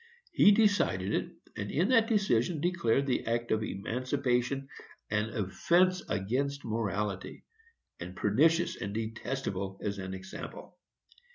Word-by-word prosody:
He 205 - +6
decided 200 - +2
it, - - -1 0.2
and 105 0 -4
in 175 - +1
that 230 -3 +5
decision 175 - +1
declared 145 -6 +1
the 130 - 0
act 120 +1 -1
of 110 - +2
emancipation 125 +5 -1 0.4
an 105 +1 0
offence 170 - +2
against 135 +8 -1
morality, 105 -3 -3 0.6
and 90 +1 -7
pernicious 160 - +2
and 100 -1 -4
detestable 110 -4 -3
as 100 -1 -2
an 95 0 -5
example. 95 0 -9
115 Hz, 120 wpm, -30 LUFS, 100-145 Hz, 0.6 s, He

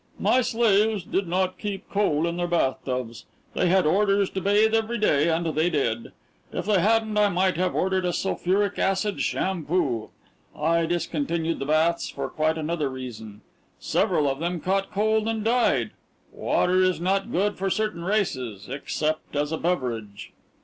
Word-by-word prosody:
"My 255 - +3
slaves 220 -4 +2
did 190 +2 -2
not 185 +2 -1
keep 205 -2 -5
coal 170 -6 +1
in 170 0 -2
their 175 0 -1
bathtubs. 130 -7 -2 0.3
They 180 - +1
had 185 -1 +3
orders 200 +3 +2
to 190 - -3
bathe 210 +3 +3
every 225 +1 +1
day, 160 -7 +2
and 165 +1 0
they 160 +4 +2
did. 120 -8 -1 0.4
If - - -4
they 205 -3 +3
hadn't 220 0 +2
I 205 -1 +4
might 185 -1 +1
have 180 0 0
ordered 190 0 +1
a 180 - +1
sulphuric 195 +2 0
acid 195 +1 0
shampoo. 165 - -1 0.5
I 165 +2 +1
discontinued 165 -1 -1
the 135 - -4
baths 160 +3 +2
for - - -5
quite 155 +1 0
another 155 -2 -1
reason. 115 -5 -8 0.4
Several 145 - +1
of 135 0 -1
them 175 +1 -2
caught 195 +4 -1
cold 220 +2 +1
and 225 -1 -1
died. 240 +1 +2 0.4
Water 185 +1 +1
is 185 -2 +2
not 195 +5 0
good 205 0 0
for 195 0 0
certain 210 -4 -1
races 130 - -2
except 150 +3 -3
as 145 +1 0
a 160 - -1
beverage." 120 - -3
180 Hz, 165 wpm, -25 LUFS, 155-200 Hz, 0.5 s, I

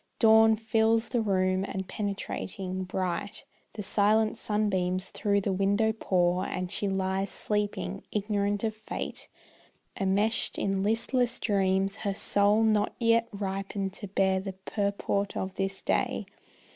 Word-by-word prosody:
Dawn 220 -1 +6
fills 225 +1 +1
the 240 -2 +1
room, 185 -2 +1
and 190 -1 -4
penetrating, 190 -2 -4
bright, 185 +1 -3 0.3
The 210 - -5
silent 215 +2 +2
sunbeams 190 -3 -1
through 200 -1 +1
the 195 0 -1
window 200 +3 +2
pour. 180 -4 +1
And 180 0 -3
she 205 - -1
lies 190 0 -1
sleeping, 210 0 -2
ignorant 205 0 -1
of 220 -1 0
Fate, 220 0 -6 0.7
Enmeshed 205 +3 +1
in 195 -1 0
listless 230 +3 +2
dreams, 195 -2 +1
her 200 -2 -2
soul 205 +2 +3
not 215 -2 +2
yet 230 -1 +3
Ripened 195 -1 -3
to 205 - -5
bear 190 0 +1
the 190 0 -5
purport 200 -1 -1
of 190 0 -3
this 195 0 -3
day. - - 0
200 Hz, 130 wpm, -28 LUFS, 190-215 Hz, 0.7 s, Dawn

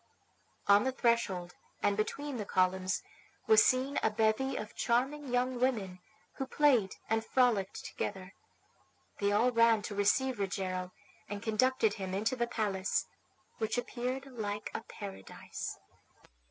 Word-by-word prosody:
On 200 +1 +6
the 260 - +1
threshold, 230 -8 0 0.3
and 205 - +3
between 275 +6 -2
the 210 - -3
columns, 185 +1 +1 0.4
was 440 - +7
seen 260 +2 +2
a - - +3
bevy 220 +5 +1
of 215 - -5
charming 270 +5 0
young 250 0 0
women, 210 -8 0 0.4
who 270 - -3
played 260 -9 +3
and 225 0 +1
frolicked 225 -6 +1
together. 190 -1 -5 0.9
They 200 0 +2
all 235 +5 +3
ran 230 -2 +4
to 205 - -5
receive 240 +5 +2
Rogero, 185 -2 -2 0.4
and 205 -1 -5
conducted 225 0 +2
him 190 -3 -4
into 220 +6 0
the 235 -1 0
palace, 200 -5 0 0.5
which 220 +1 -1
appeared 250 +2 -3
like 210 -6 -4
a - - -3
paradise. 200 - -7
220 Hz, 135 wpm, -32 LUFS, 200-255 Hz, 0.9 s, was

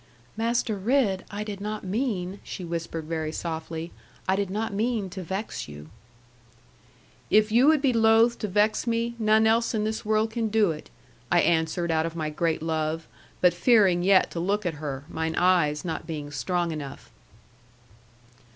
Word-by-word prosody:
'Master 230 -1 0
Ridd, 210 -3 +1
I 205 +1 -4
did 205 -2 -6
not 210 +1 -4
mean,' 200 -2 -2
she 180 - -7
whispered, 165 -1 -4
very 160 -1 -3
softly, 160 0 -5 0.4
'I 190 - +3
did 200 -1 -1
not 210 +2 -2
mean 215 -2 -1
to 190 - -6
vex 190 +5 -4
you.' 75 +1 -11 1.4
'If 215 0 +4
you 245 +5 +5
would 310 -2 +4
be 265 -3 +3
loath 225 +1 +4
to 210 - -2
vex 210 +4 +1
me, 230 0 0
none 220 0 +4
else 230 +1 +2
in 210 - 0
this 220 +1 -2
world 215 0 +1
can 225 0 -1
do 215 -4 +3
it,' 155 - -8 0.4
I 175 - +5
answered 165 +1 +1
out 160 0 +1
of 165 - -7
my 155 -2 -2
great 160 0 -1
love, 160 0 -1 0.4
but 180 -1 +5
fearing 190 -2 +4
yet 190 +1 +4
to 170 - -4
look 200 +4 0
at 175 - 0
her, 140 -3 -4
mine 160 0 -3
eyes 175 -4 +2
not 165 - -4
being 150 -3 -5
strong 170 +5 -1
enough. 145 -3 -7
190 Hz, 170 wpm, -26 LUFS, 165-220 Hz, 1.4 s, you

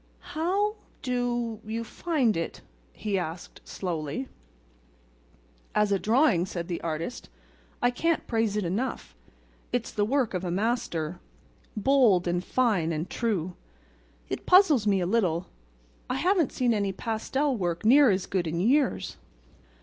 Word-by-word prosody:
"How—do—you 245 - -2
find 260 -2 0
it?" 165 0 -4 0.3
he 200 -2 -2
asked, 170 0 -6
slowly. 170 - -4 1.5
"As 210 -1 +3
a 200 - +2
drawing," 220 - +3
said 170 -2 -5
the 175 - -3
artist, 165 +7 -4 0.5
"I 245 - +4
can't 330 +6 0
praise 225 -3 0
it 210 - -1
enough. 210 +10 -3 0.6
It's 245 -2 -1
the 205 - 0
work 250 0 +1
of 180 -1 -2
a 180 - -2
master—bold 195 - 0
and 175 +1 0
fine 205 -11 +1
and 160 +2 -2
true. 185 -7 -1 0.7
It - - -5
puzzles 325 - +6
me 195 -2 +3
a - - 0
little; 185 -4 +1 0.6
I 255 - 0
haven't 350 +2 +2
seen 245 -2 +1
any 200 -2 0
pastel 235 +7 -1
work 175 -2 -2
near 270 +3 +7
as 190 -2 +1
good 185 -4 -1
in 165 +2 -2
years." 260 +7 +1
215 Hz, 130 wpm, -27 LUFS, 180-255 Hz, 1.5 s, near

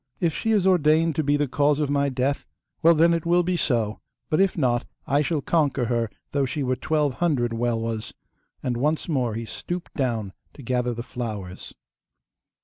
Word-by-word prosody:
If 170 -3 +1
she 225 - -1
is 205 -4 +3
ordained 165 -3 +4
to 155 - +2
be 145 +1 +2
the 145 0 +1
cause 145 +3 +2
of 145 -2 0
my 140 0 +2
death, 135 +2 -1 0.3
well, 165 +1 +6
then 165 +2 +5
it 165 -1 0
will 175 +1 +3
be 180 +1 0
so; 115 -9 0 0.3
but 155 - +3
if 195 -2 +2
not 120 -5 +2 0.2
I 140 +2 +2
shall 150 0 0
conquer 145 -6 +1
her 115 -1 0 0.2
though 140 -1 +1
she 145 +3 -2
were 130 0 +1
twelve 150 +1 0
hundred 125 -6 0
Welwas,' 115 -1 -2 0.5
and 120 -2 -1
once 150 +5 0
more 125 -9 0
he 115 0 -4
stooped 175 +9 -6
down 115 -8 -1 0.2
to 140 - -11
gather 125 0 0
the 120 - -5
flowers. 105 -8 -6
140 Hz, 190 wpm, -24 LUFS, 120-160 Hz, 0.5 s, well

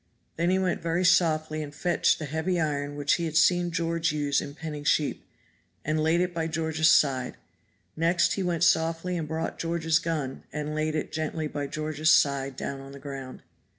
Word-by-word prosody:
Then 170 +2 +1
he 185 - +3
went 185 -2 0
very 170 +2 0
softly 155 -3 +2
and 145 -1 -7
fetched 175 +3 +2
the 155 - -5
heavy 160 +5 -1
iron 145 -2 -2
which 145 0 +1
he - - -1
had 160 -1 -1
seen 175 0 +4
George 165 -1 0
use 145 -2 0
in 145 0 -8
penning 150 -2 -6
sheep, 150 0 +1 0.6
and 155 +1 0
laid 160 +3 +2
it 180 0 -1
by 165 -1 -1
George's 160 0 +1
side; 135 -5 +2 0.6
next 170 +2 +2
he 195 - -2
went 175 -2 0
softly 165 +1 +2
and 165 -3 -3
brought 160 +1 -3
George's 165 -1 +1
gun, 150 -5 -3
and 150 0 -4
laid 155 0 -1
it 155 - -3
gently 155 0 -3
by 145 -1 -4
George's 155 +2 0
side 140 -1 +3
down 135 +1 -5
on 135 0 -11
the 140 - -10
ground. 135 -2 -8
155 Hz, 190 wpm, -27 LUFS, 145-165 Hz, 0.6 s, seen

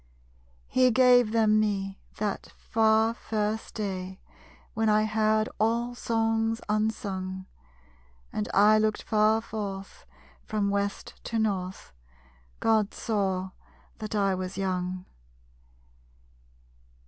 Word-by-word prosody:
_He 255 -1 +5
gave 245 -2 +5
them 215 -1 +4
me, 195 -2 -1 0.2
that 205 -2 -2
far, 220 0 +2
first 215 -1 -3
day 190 -3 -4 0.5
When 220 -1 +1
I 215 0 +4
heard 215 0 +2
all 235 +2 +1
Songs 225 -1 0
unsung. 195 -3 -2 0.9
And 105 - -2
I 210 +2 +5
looked 215 0 0
far 215 +1 +3
forth, 200 -3 -6 0.4
from 205 -2 -1
west 200 0 -3
to 230 - -2
north. 190 - -2 0.7
God 220 -2 +2
saw 190 -4 -1 0.5
that 215 0 -5
I 195 -2 +2
was 185 0 -4
young! 185 -1 -2
215 Hz, 100 wpm, -27 LUFS, 195-220 Hz, 0.9 s, He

